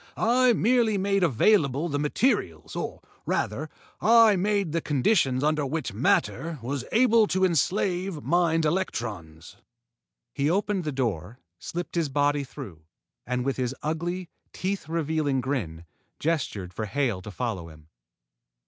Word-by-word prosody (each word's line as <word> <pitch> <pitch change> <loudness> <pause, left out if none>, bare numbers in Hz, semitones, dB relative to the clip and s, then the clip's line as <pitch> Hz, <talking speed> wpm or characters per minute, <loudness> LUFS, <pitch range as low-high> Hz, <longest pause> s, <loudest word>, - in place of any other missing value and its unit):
I 245 +2 +4
merely 230 -1 +2
made 195 0 +1
available 155 - +3
the 145 -3 -2
materials, 145 - 0
or, - - -4 0.3
rather, 140 +10 -1 0.3
I 225 -1 +6
made 200 -2 0
the 165 +1 0
conditions 140 - +2
under 150 0 +1
which 150 -3 -3
matter 165 - 0
was 135 +2 -3
able 230 -2 +4
to 190 0 +2
enslave 180 0 0
mind 165 -2 +2
electrons." 105 - -3 0.8
He 140 +2 0
opened 195 0 0
the 150 - -1
door, 115 - -3 0.2
slipped 175 +1 -5
his 165 -4 0
body 145 +1 +1
through, 90 - -10 0.5
and, 125 0 -1
with 135 - -1
his 130 0 -2
ugly, 170 +4 -2 0.3
teeth 190 -3 -3
revealing 155 -4 0
grin, 105 - -3 0.3
gestured 130 - -2
for 110 - -3
Hale 120 -6 -1
to 100 - -9
follow 100 -6 -4
him. 75 -1 -16
150 Hz, 135 wpm, -26 LUFS, 125-185 Hz, 0.8 s, I